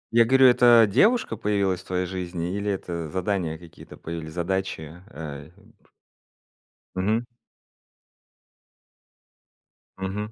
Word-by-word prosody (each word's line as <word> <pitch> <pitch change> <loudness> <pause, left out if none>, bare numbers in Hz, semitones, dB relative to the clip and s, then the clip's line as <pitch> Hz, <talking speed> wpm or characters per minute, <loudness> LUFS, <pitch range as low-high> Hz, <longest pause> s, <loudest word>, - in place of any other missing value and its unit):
Я 115 0 +6
говорю, 130 +2 +6
это 120 -2 +6
девушка 215 - +3
появилась 100 -3 0
в - - -15
твоей 90 0 -2
жизни 90 -1 -4
или 100 0 -2
это 85 -4 -4
задания 90 -1 -2
какие-то 85 0 -14
появились, 80 -1 -7
задачи, 90 -2 -3
э, 75 -1 -8
вот? 100 +1 -22 1.3
Мгм. 105 +6 0 2.7
Мгм. 100 +3 -4
95 Hz, 105 wpm, -25 LUFS, 85-105 Hz, 2.7 s, Я